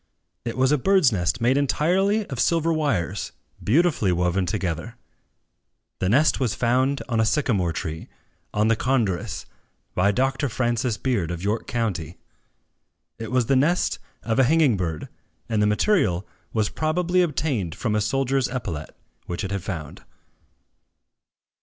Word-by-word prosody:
It 115 - -4
was 130 +1 +3
a 150 - +3
birdsnest 125 - +2
made 125 +3 +3
entirely 185 +9 +2
of 135 -8 -6
silver 165 +1 +2
wires, 120 - -1 0.3
beautifully 140 - +2
woven 90 +1 +1
together. 90 +3 -3 1.0
The 95 - 0
nest 140 +8 +3
was 125 -5 0
found 130 +4 +1
on 115 -3 0
a - - +4
sycamore 110 - +1
tree, 80 0 -5 0.4
on 105 +1 +1
the 115 - +3
Condorus, 110 -8 -1 0.5
by 95 +3 +3
Dr. 135 +5 0
Francis 120 -1 0
Beard, 115 -11 -1
of 85 0 -5
York 105 +3 -1
county. 95 -9 -2 1.0
It 115 - -5
was 125 -2 +2
the 135 - +2
nest 155 +7 +2 0.2
of 115 +2 0
a 130 - +6
hanging 150 -3 +4
bird; 85 -5 -3 0.4
and 110 -3 0
the 105 - +4
material 105 - +2 0.3
was 110 -2 0
probably 175 +3 +1
obtained 135 - -1
from 110 -4 -2
a 105 - +1
soldier's 135 +4 +1
epaulet, 90 - -5 0.3
which 90 +4 -3
it 95 - -4
had 100 -1 -2
found. 80 -6 -6
115 Hz, 145 wpm, -24 LUFS, 95-140 Hz, 1.0 s, a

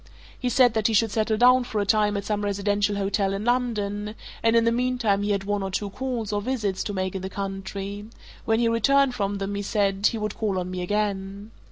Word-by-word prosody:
He 250 - -1
said 245 -1 +4
that 220 -2 +2
he 225 - +1
should 225 0 +3
settle 220 0 0
down 250 +2 +6
for 220 -3 -3
a 205 - 0
time 210 0 +2
at 200 - -4
some 210 -1 -1
residential 205 0 0
hotel 195 0 0
in 200 +2 -3
London, 210 -4 -1 0.3
and 225 0 +3
in 230 - +5
the 230 - +3
meantime 240 -4 +1
he 205 - -1
had 200 -1 0
one 205 0 -1
or 195 - -2
two 200 +1 -3
calls, 240 -4 -3
or 205 - 0
visits, 210 -5 -2
to 205 - -3
make 185 -1 -2
in 190 - -4
the 190 - -4
country: 195 +1 -5 0.4
when 225 0 +1
he 235 - +3
returned 270 +4 +3
from 200 -3 -2
them, 195 +1 -3
he 200 - -2
said, 200 -1 +1
he 230 - -1
would 215 -1 -3
call 205 -4 -1
on 180 0 -3
me 185 0 -4
again. 200 +1 -2
205 Hz, 235 wpm, -25 LUFS, 200-225 Hz, 0.4 s, down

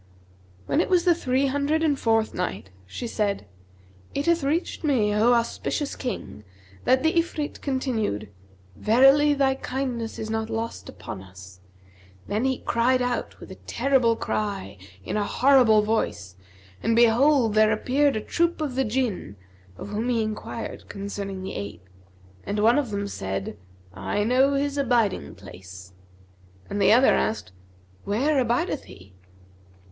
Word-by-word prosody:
When 310 - +2
it - - -2
was 360 -1 +3
the 350 - +6
Three 265 -4 0
Hundred 285 +4 0
and 300 -3 +3
fourth 225 -1 +1
Night, 180 - -4 0.2
She 240 - -6
said, 210 -3 -1 0.7
It 280 - -1
hath 340 -2 +2
reached 315 +6 -1
me, 235 -9 +2
O 225 +4 +4
auspicious 240 +4 -1
King, 245 - -6 0.4
that 260 +2 +3
the 320 - +3
Ifrit 310 -3 -3
continued, 225 - -2 0.4
"'Verily 270 +6 +5
thy 270 -1 +2
kindness 255 -4 -4
is 220 - -4
not 220 0 -2
lost 225 0 -4
upon 95 - -8
us.' 95 -1 -13 0.7
Then 215 +5 -1
he 260 -1 +1
cried 250 +2 +2
out 245 -1 -2
with - - -11
a - - -9
terrible 260 -4 +2
outcry 200 - -3 0.3
in 210 - -3
a 210 - +1
horrible 245 -2 +4
voice, 155 - -2 0.5
and 230 - +1
behold, 240 +1 +4
there 215 0 +4
appeared 270 +6 +1
a 215 - -1
troop 340 +8 0
of 300 -4 -2
the 265 +1 +1
Jinn, 220 - -2 0.4
of - - -8
whom 215 +4 -2
he 230 -2 +1
enquired 215 +1 -6
concerning 200 -1 -5
the 190 - -5
ape; 100 -2 -7 0.6
and 205 - -3
one 230 +6 +4
of 275 -5 -2
them 200 -1 -3
said, 95 - -4 0.4
'I 95 - -2
know 260 +5 +3
his 285 +1 -1
abiding 240 -7 +1
place;' 95 -1 -12 0.8
and 205 0 -1
the - - +5
other 250 +4 +6
asked 105 -4 -1 0.5
'Where 270 +8 +1
abideth 250 +5 0
he?' 95 +1 -15
230 Hz, 150 wpm, -25 LUFS, 205-270 Hz, 0.8 s, the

